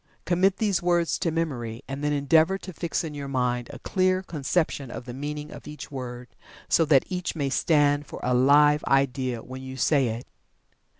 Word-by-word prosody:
Commit 185 +2 +2
these 205 -5 +1
words 175 -1 +1
to 175 - 0
memory, 135 -8 -3
and 135 +2 -5
then 150 - +1
endeavor 160 +6 +3
to 190 -1 -9
fix 170 +2 -2
in 160 -2 -5
your 140 -1 -6
mind 125 -2 -1
a - - -8
clear 185 0 +1
conception 150 -4 -1
of 120 - -7
the 125 - -7
meaning 150 +3 -5
of - - -11
each 150 -2 -9
word, 125 -2 -6 0.4
so 165 - +3
that 145 -4 +4
each 180 -2 -3
may 140 -4 -1
stand 145 -1 +2
for - - -8
a 125 - +1
Live 145 +4 +5
Idea 130 -2 +1
when 130 +1 -8
you 130 0 -8
say 140 -2 +3
it. 115 +2 -4
145 Hz, 190 wpm, -26 LUFS, 130-165 Hz, 0.4 s, Live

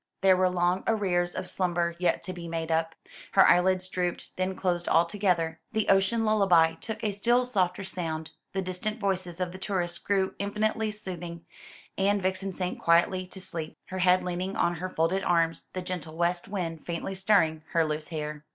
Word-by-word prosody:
There 190 -1 +6
were 185 0 +3
long 180 +1 +1
arrears 180 -5 +1
of - - -4
slumber 175 -2 0
yet 180 - +1
to 185 +2 -4
be 175 -1 -7
made 165 0 -3
up. 160 0 0 0.4
Her 195 - +7
eyelids 185 +1 +4
drooped, 180 -1 -3
then 185 +1 -1
closed 175 -2 -1
altogether, 170 -2 +2
the 220 -2 0
ocean 195 +4 +3
lullaby 185 -7 +4
took 220 +7 -7
a 210 - +1
still 240 +5 +2
softer 190 -6 0
sound, 160 -4 -4 0.2
the 190 0 -1
distant 185 +4 -3
voices 185 -3 -2
of 180 -1 -1
the 185 - -9
tourists 175 -3 -2
grew 195 -2 0
infinitely 215 +2 0
soothing, 175 -5 -7 0.5
and 200 +1 +3
Vixen 190 +1 -1
sank 180 0 -3
quietly 180 +2 +3
to 190 - -9
sleep, 165 -4 -5
her 185 - -4
head 180 0 +4
leaning 180 +2 -3
on 175 0 +1
her 185 +3 -4
folded 185 +3 0
arms, 165 -3 +1
the 185 - -4
gentle 175 -3 -5
west 175 +1 0
wind 170 -5 -4
faintly 170 +2 -4
stirring 190 -5 +2
her 165 -1 +4
loose 155 0 -3
hair. 150 -2 -5
180 Hz, 180 wpm, -28 LUFS, 170-195 Hz, 0.5 s, Her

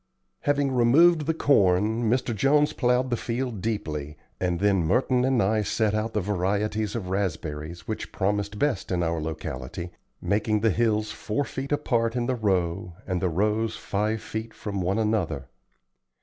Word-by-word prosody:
Having 145 -1 +1
removed 150 +6 +5
the 165 - +2
corn, 110 - +3
Mr. 125 0 +1
Jones 145 +6 +3
plowed 125 0 +1
the - - +3
field 120 -3 -3
deeply, 75 -9 -3 0.2
and 90 -2 0
then 100 -2 +3
Merton 125 +9 +2
and 130 -3 +3
I 110 +2 +2
set 105 +1 0
out 110 +1 -1
the 105 - +1
varieties 105 +3 -1
of 100 -6 -4
raspberries 85 -3 -3
which 110 - -4
promised 100 +1 -1
best 145 -3 0
in 90 -1 +1
our 80 -1 -1
locality, 80 +1 -5 0.3
making 105 +1 0
the 110 -1 +3
hills 110 0 +1
four 110 +7 -2
feet 135 +2 -5
apart 120 -5 +1
in 120 -1 0
the 130 - 0
row, 95 -5 0
and 90 -2 -2
the 90 - +1
rows 105 +6 0
five 105 +2 -1
feet 110 +1 -5
from 100 -3 -4
one 95 +3 0
another. 100 - 0
105 Hz, 165 wpm, -26 LUFS, 90-120 Hz, 0.3 s, removed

